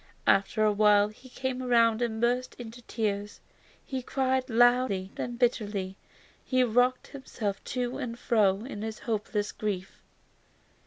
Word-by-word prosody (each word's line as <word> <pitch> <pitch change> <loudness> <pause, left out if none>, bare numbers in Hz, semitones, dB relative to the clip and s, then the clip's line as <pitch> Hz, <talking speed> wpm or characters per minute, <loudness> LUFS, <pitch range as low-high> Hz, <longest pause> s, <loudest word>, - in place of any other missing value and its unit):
After 200 +3 +3
a 210 - +4
while 205 0 +4
he 250 +5 -16
came 260 0 -3
round 230 -2 +3
and 225 -2 -1
burst 245 +2 0
into 235 0 -9
tears. 210 -3 -3 0.5
He 265 -2 -4
cried 260 0 0
loudly 240 -5 +3
and 240 0 -4
bitterly. 205 -6 0 0.5
He 255 -1 +2
rocked 245 +2 +2
himself 225 -7 -5
to 250 0 -3
and 240 -4 -4
fro 210 -4 +2
in 210 -6 -7
his 220 0 -4
hopeless 210 -2 -2
grief. 195 -3 -4
230 Hz, 140 wpm, -28 LUFS, 210-250 Hz, 0.5 s, a